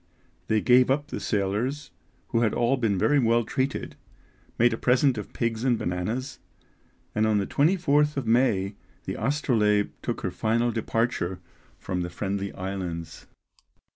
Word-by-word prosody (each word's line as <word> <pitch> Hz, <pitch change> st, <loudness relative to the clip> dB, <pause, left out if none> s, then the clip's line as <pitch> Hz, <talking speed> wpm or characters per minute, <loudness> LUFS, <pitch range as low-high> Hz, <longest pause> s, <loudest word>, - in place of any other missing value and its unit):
They 110 Hz, -1 st, +2 dB
gave 125 Hz, 0 st, +5 dB
up 145 Hz, +3 st, 0 dB
the -, -, -4 dB
sailors, 110 Hz, +8 st, -2 dB, 0.4 s
who 115 Hz, -, +1 dB
had 110 Hz, -3 st, +1 dB
all 120 Hz, +3 st, +2 dB
been 115 Hz, -6 st, 0 dB
very 145 Hz, +9 st, +3 dB
well 115 Hz, -1 st, +3 dB
treated, 130 Hz, +4 st, -2 dB, 0.6 s
made 120 Hz, 0 st, +4 dB
a -, -, -2 dB
present 125 Hz, +1 st, +3 dB
of 105 Hz, -3 st, -6 dB
pigs 115 Hz, -1 st, -2 dB
and 125 Hz, -3 st, +2 dB
bananas; 110 Hz, +10 st, -3 dB, 0.7 s
and 110 Hz, +1 st, +2 dB
on 110 Hz, -1 st, +2 dB
the 100 Hz, -, 0 dB
24th 150 Hz, -, +2 dB
of 135 Hz, -, -2 dB
May 110 Hz, -4 st, +2 dB, 0.3 s
the -, -, -3 dB
Astrolabe 110 Hz, -8 st, +1 dB
took -, -, -3 dB
her 95 Hz, -, -2 dB
final 115 Hz, +5 st, +1 dB
departure 115 Hz, -5 st, -1 dB, 0.4 s
from 90 Hz, -1 st, -3 dB
the 90 Hz, -, -3 dB
Friendly 100 Hz, +2 st, -3 dB
Islands. 90 Hz, -3 st, -5 dB
115 Hz, 150 wpm, -26 LUFS, 100-130 Hz, 0.7 s, gave